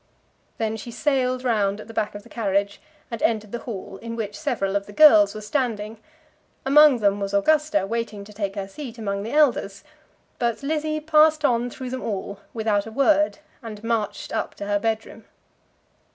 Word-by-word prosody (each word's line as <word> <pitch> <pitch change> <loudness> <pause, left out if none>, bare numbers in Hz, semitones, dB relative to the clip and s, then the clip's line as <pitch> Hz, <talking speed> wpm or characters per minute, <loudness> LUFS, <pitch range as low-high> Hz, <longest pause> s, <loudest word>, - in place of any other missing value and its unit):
Then 220 -1 -1
she 230 - -8
sailed 255 +1 0
round 210 -4 +1
at 215 - -10
the 225 - -10
back 210 -2 -2
of 205 - -8
the - - -16
carriage 200 -3 -1 0.3
and 230 - -5
entered 215 -2 0
the 235 - -4
hall, 195 -5 -7
in 230 +3 -7
which 215 -3 -4
several 235 -11 -2
of 200 0 -1
the 205 - -11
girls 215 -8 +7
were 215 - -6
standing. 220 -2 -2 0.7
Among 295 0 +7
them 205 -2 +2
was 200 0 -2
Augusta, 300 -2 +2
waiting 220 -1 -3
to 210 +1 -13
take 200 -1 -3
her 195 -1 -4
seat 245 +3 -8
among 200 -3 -3
the 225 +5 -5
elders; 245 -10 +2 0.6
but 235 +1 -1
Lizzie 310 +1 -1
passed 310 0 +4
on 245 -2 +2
through 255 +1 -7
them 260 - -4
all, 200 -2 -4
without 215 -2 0
a - - -8
word, 300 +5 +3 0.2
and 220 -3 -9
marched 230 -2 -2
up - - -2
to 200 - -6
her 205 0 +1
bed 220 +1 -1
room. 225 - -14
225 Hz, 190 wpm, -24 LUFS, 205-260 Hz, 0.7 s, girls